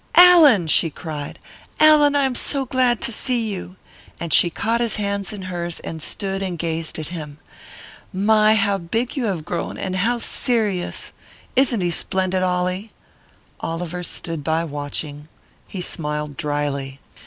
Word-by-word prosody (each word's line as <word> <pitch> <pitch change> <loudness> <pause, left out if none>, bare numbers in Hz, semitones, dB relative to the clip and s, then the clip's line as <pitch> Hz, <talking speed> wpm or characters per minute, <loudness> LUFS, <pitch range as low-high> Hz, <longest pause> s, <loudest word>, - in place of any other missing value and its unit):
"Allan!" 330 - +8
she 160 +1 +4
cried, 150 -2 -7 0.4
"Allan! 300 -2 +6
I 280 -1 +3
am 265 - 0
so 270 +2 -1
glad 250 -2 +1
to - - 0
see 235 0 -1
you!" 185 -1 -7 0.4
And 170 -1 -2
she 175 - +7
caught 230 +7 -1
his 235 -2 +1
hands 200 -2 -2
in 205 -3 -7
hers 175 -2 -4
and 160 -1 -7
stood 195 +4 -3
and 185 -3 -3
gazed 165 -1 -2
at 155 -2 -5
him. 150 -4 -7 0.7
"My, 215 +2 +4
how 200 -2 +1
big 225 - -2
you 265 -4 -1
have 180 -7 -2
grown, 170 -1 -4
and 185 -1 -3
how 235 +6 +1
serious! 220 -6 -2 0.4
Isn't 255 -5 +3
he 175 -1 0
splendid, 185 +1 -1
Ollie?" 185 +3 -1 0.7
Oliver 175 +1 -4
stood 165 -3 -4
by, 160 +2 0
watching. 145 0 -4 0.4
He 190 - -6
smiled 150 -4 -3
drily. 145 -3 -3
185 Hz, 155 wpm, -21 LUFS, 165-225 Hz, 0.7 s, Allan